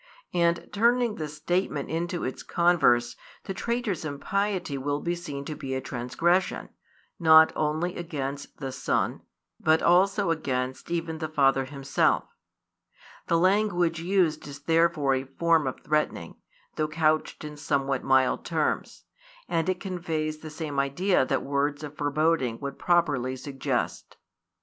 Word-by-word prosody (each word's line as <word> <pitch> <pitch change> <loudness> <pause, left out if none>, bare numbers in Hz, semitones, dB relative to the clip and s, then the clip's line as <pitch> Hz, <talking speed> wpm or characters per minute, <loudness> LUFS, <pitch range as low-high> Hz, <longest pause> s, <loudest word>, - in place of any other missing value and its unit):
And 170 -1 +1
turning 235 +2 +3
the 155 - -3
statement 155 0 -2
into 175 +2 -2
its 130 - -4
converse, 160 -9 +3 0.3
the 195 - -4
traitor's 235 -5 -2
impiety 185 +3 -2
will 145 +2 -2
be 170 +3 -1
seen 145 -5 -6
to 155 - -4
be 130 -2 -4
a - - -1
transgression, 150 +9 0 0.5
not 160 -1 +7
only 155 +4 -1
against 140 -5 -5
the 135 -2 -5
Son, - - -1 0.4
but 160 0 +3
also 195 +1 +4
against 130 -4 -2
even 165 -2 -2
the 155 -1 -3
Father 135 -3 +3
Himself. 140 0 +1 1.0
The 170 - +3
language 180 -2 +2
used 170 -4 +1
is 145 0 -10
therefore 165 -3 +3
a 130 0 0
form 160 +2 +2
of 130 - -5
threatening, 150 0 -1 0.4
though 155 - +1
couched 155 0 0
in 150 0 -7
somewhat 140 -3 -1
mild 130 -1 +3
terms; 160 -3 -2 0.4
and 165 +1 0
it 185 -1 0
conveys 160 -5 -3
the 155 - -8
same 150 -2 -4
idea 140 +4 +2
that - - -1
words 145 +1 -1
of 150 0 -7
foreboding 145 -4 +1
would 140 -1 -6
properly 145 -8 +1
suggest. 135 +1 -3
155 Hz, 140 wpm, -27 LUFS, 140-175 Hz, 1.0 s, not